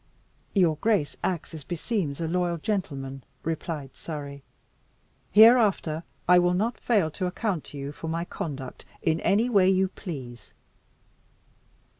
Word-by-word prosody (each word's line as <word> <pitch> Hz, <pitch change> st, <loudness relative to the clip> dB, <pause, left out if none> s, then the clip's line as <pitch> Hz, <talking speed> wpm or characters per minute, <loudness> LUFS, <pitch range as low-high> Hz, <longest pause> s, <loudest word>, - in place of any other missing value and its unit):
"Your 170 Hz, -6 st, +4 dB
grace 205 Hz, -6 st, +1 dB
acts 175 Hz, -4 st, -2 dB
as 155 Hz, -3 st, -7 dB
beseems 170 Hz, -, -2 dB
a 165 Hz, -, -1 dB
loyal 175 Hz, 0 st, 0 dB
gentleman," 140 Hz, -, -3 dB, 0.2 s
replied 155 Hz, -4 st, -4 dB
Surrey. 140 Hz, -3 st, -7 dB, 0.9 s
"Hereafter 210 Hz, -8 st, +5 dB, 0.3 s
I 180 Hz, 0 st, +7 dB
will 175 Hz, 0 st, +3 dB
not 225 Hz, +6 st, -1 dB
fail 200 Hz, -10 st, +2 dB
to 185 Hz, +3 st, -2 dB
account 180 Hz, -2 st, -2 dB
to 145 Hz, -, -10 dB
you 140 Hz, 0 st, -5 dB
for 160 Hz, -, -8 dB
my 165 Hz, +1 st, -2 dB
conduct 135 Hz, -7 st, -6 dB, 0.2 s
in 160 Hz, 0 st, +2 dB
any 215 Hz, +8 st, +2 dB
way 200 Hz, -6 st, +4 dB
you 190 Hz, 0 st, +3 dB
please." 130 Hz, -, -8 dB
170 Hz, 135 wpm, -27 LUFS, 150-190 Hz, 0.9 s, I